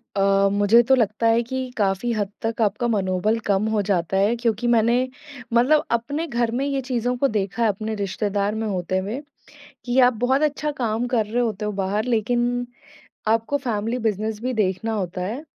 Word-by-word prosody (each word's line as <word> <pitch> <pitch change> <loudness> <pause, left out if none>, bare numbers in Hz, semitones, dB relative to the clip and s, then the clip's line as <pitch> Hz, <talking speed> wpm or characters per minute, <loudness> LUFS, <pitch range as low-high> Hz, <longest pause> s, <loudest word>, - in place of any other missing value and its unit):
अ, 195 0 +3
मुझे 205 +3 +5
तो 265 - +7
लगता 225 -1 +1
है 225 +1 +4
कि 260 +1 -4
काफ़ी 200 +3 0
हद 205 -2 -2
तक 225 +1 -2
आपका 225 +3 +1
मनोबल 205 0 +1
कम 200 +1 +2
हो 220 -1 +1
जाता 190 -2 0
है, 205 +4 +3
क्योंकि 235 0 -1
मैंने 235 0 +3 0.6
मतलब 265 +6 +4
अपने 285 +8 -1
घर 235 -4 0
में 275 - 0
ये 275 -1 -1
चीज़ों 245 -1 -1
को 275 - +2
देखा 210 0 -1
है 225 - +4
अपने 215 +2 -3
रिश्तेदार 200 +1 -1
में 220 0 -2
होते 185 -2 -1
हुए, 205 +8 -3 0.6
कि 245 +1 +1
आप 250 0 +6
बहुत 265 +3 +2
अच्छा 300 +1 -3
काम 230 +1 0
कर 240 -4 +1
रहे 230 +4 -1
होते 215 -3 -2
हो 210 - -1
बाहर, 200 +3 0
लेकिन 245 +1 0 0.6
आपको 225 +5 +1
फ़ैमिली 225 +2 -1
बिजनेस 215 +1 -2
भी 255 +1 -2
देखना 215 0 0
होता 185 -3 -3
है 220 +11 -4
225 Hz, 190 wpm, -23 LUFS, 205-245 Hz, 0.6 s, तो